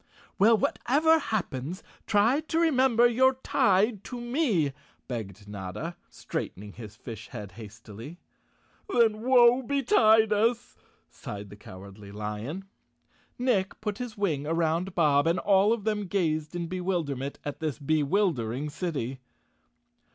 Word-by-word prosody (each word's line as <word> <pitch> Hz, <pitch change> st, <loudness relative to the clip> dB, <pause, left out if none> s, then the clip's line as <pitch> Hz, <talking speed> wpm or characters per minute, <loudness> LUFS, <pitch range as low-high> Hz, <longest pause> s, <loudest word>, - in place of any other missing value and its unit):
Well, 220 Hz, +3 st, +6 dB
whatever 315 Hz, +10 st, +2 dB
happens, 180 Hz, -, -3 dB, 0.2 s
try 225 Hz, +6 st, +3 dB
to 315 Hz, +1 st, -3 dB
remember 260 Hz, -7 st, +4 dB
you're 260 Hz, +2 st, +4 dB
_ -, -, -20 dB
Chapter -, -, -30 dB
Sixteen 260 Hz, -, -3 dB, 0.4 s
tied -, -, -32 dB
to 245 Hz, -, -6 dB
me," 240 Hz, -, 0 dB, 0.3 s
begged 105 Hz, -4 st, -6 dB
Notta, 105 Hz, -, -6 dB
straightening 100 Hz, +1 st, -6 dB
his 110 Hz, -2 st, -10 dB
fish 115 Hz, 0 st, -9 dB
head 105 Hz, -2 st, -8 dB
hastily. 115 Hz, -, -11 dB, 0.4 s
" -, -, -37 dB
Then 220 Hz, -, +3 dB
woe 245 Hz, 0 st, +5 dB
betide 225 Hz, -5 st, +4 dB
us," 230 Hz, +3 st, 0 dB, 0.3 s
sighed 100 Hz, -1 st, -9 dB
the -, -, -9 dB
Cowardly 100 Hz, +1 st, -12 dB
Lion. 105 Hz, -, -5 dB, 0.7 s
Nick 235 Hz, -7 st, 0 dB
put 210 Hz, -1 st, -4 dB
his 245 Hz, -4 st, -6 dB
wing 155 Hz, -8 st, -1 dB
around 165 Hz, +3 st, 0 dB
Bob 150 Hz, -3 st, +3 dB
and 170 Hz, +2 st, +2 dB
all 200 Hz, +2 st, +3 dB
of 230 Hz, -3 st, -1 dB
them 210 Hz, -2 st, -1 dB
gazed 160 Hz, -4 st, -1 dB
in 175 Hz, -1 st, -2 dB
bewilderment 165 Hz, -7 st, -3 dB
at 145 Hz, -, -5 dB
this 155 Hz, -4 st, -3 dB
bewildering 145 Hz, -, 0 dB
city. 140 Hz, -6 st, -4 dB
175 Hz, 135 wpm, -27 LUFS, -, 0.7 s, Well